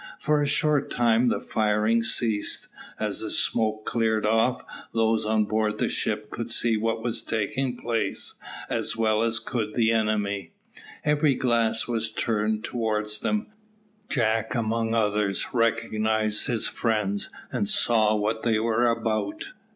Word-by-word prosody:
For 150 0 +1
a 145 - +1
short 150 -2 +1
time 120 0 +3
the - - 0
firing 110 +1 +1
ceased. 115 -2 -1 0.3
As - - -1
the - - -4
smoke 110 -1 +1
cleared 110 -2 +1
off, 115 +4 +2 0.3
those 110 -1 +2
on 110 -1 +2
board 110 0 0
the - - 0
ships 105 0 -1
could 115 0 -5
see 115 0 +2
what 115 +1 -1
was 115 -1 -1
taking 120 +4 -2
place, 115 -4 -2 0.3
as - - -1
well 110 -1 +2
as 115 0 +2
could 110 -1 -3
the 115 -2 +3
enemy. 105 -5 -1 0.5
Every 150 -2 +3
glass 115 -3 +1
was 115 -2 0
turned 110 -1 -1
towards 105 -3 -2
them. 215 - -1 0.6
Jack 110 -2 0
among 115 0 0
others 105 -3 0
recognised 110 -2 +1
his 115 -2 0
friends, 100 -3 -1 0.2
and 210 - 0
saw 115 - +3
what 105 +2 -1
they 115 -2 +2
were 115 +2 +2
about. 110 -3 -1
110 Hz, 145 wpm, -26 LUFS, 110-115 Hz, 0.6 s, time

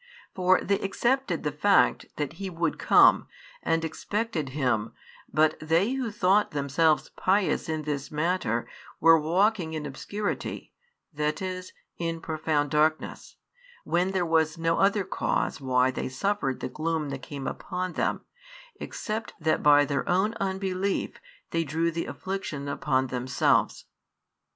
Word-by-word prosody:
For 185 0 +3
they 200 0 0
accepted 235 -1 0
the 150 - -1
fact 195 +8 +3
that 150 -1 -3
He 195 - -3
would 170 -1 -2
come, - - +5 0.3
and 165 0 0
expected 190 -2 -3
Him, 125 -6 -1 0.4
but 155 +1 +3
they 165 +9 +1
who 260 -3 -2
thought 205 0 +2
themselves 150 +2 +1
pious 190 -3 +1
in 155 -1 -2
this 145 -2 -3
matter 150 -7 0 0.3
were 165 0 +7
walking 175 +2 +1
in 155 -1 -4
obscurity, 200 +9 -4 0.4
that 150 +1 -1
is, 185 -1 -5 0.3
in 165 -1 -2
profound 155 -2 -1
darkness, 155 +1 0 0.5
when 175 +2 +1
there 190 -2 0
was 160 0 +2
no 165 0 +1
other 200 +1 +3
cause 160 - -1
why 130 -1 +2
they 130 - -4
suffered 135 -1 -1
the - - -2
gloom 155 +2 -2
that 135 -1 -5
came 140 -1 -7
upon 180 -1 -4
them, - - -1 0.6
except 220 +1 -5
that 160 -1 +1
by 145 0 +6
their 140 -1 -2
own 190 +5 +2
unbelief 190 0 -2 0.3
they 165 0 +1
drew 165 +3 0
the 165 +1 -3
affliction 185 -7 -5
upon 135 -2 0
themselves. 125 0 +1
165 Hz, 140 wpm, -27 LUFS, 150-190 Hz, 0.6 s, were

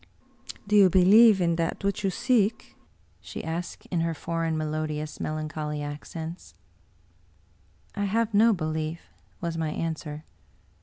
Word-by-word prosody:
" - - -13
Do 210 - +2
you 200 -2 +7
believe 200 +4 +7
in 170 -2 +1
that 165 +4 -2
which 200 +1 -1
you 195 - +2
seek? 230 0 0 0.2
" - - -36
she - - -7
asked 165 +2 -5
in 175 - 0
her 165 0 -1
foreign, 165 0 -2
melodious, 155 0 -3
melancholy 155 -1 -3
accents. 160 +3 -7 0.7
" - - -35
1 205 0 -1
have 225 +2 0
no 220 +3 +6
belief," 155 -2 -3 0.3
was 165 -1 -3
my 160 -1 -1
answer. 155 -1 -4
165 Hz, 145 wpm, -26 LUFS, 155-200 Hz, 0.7 s, you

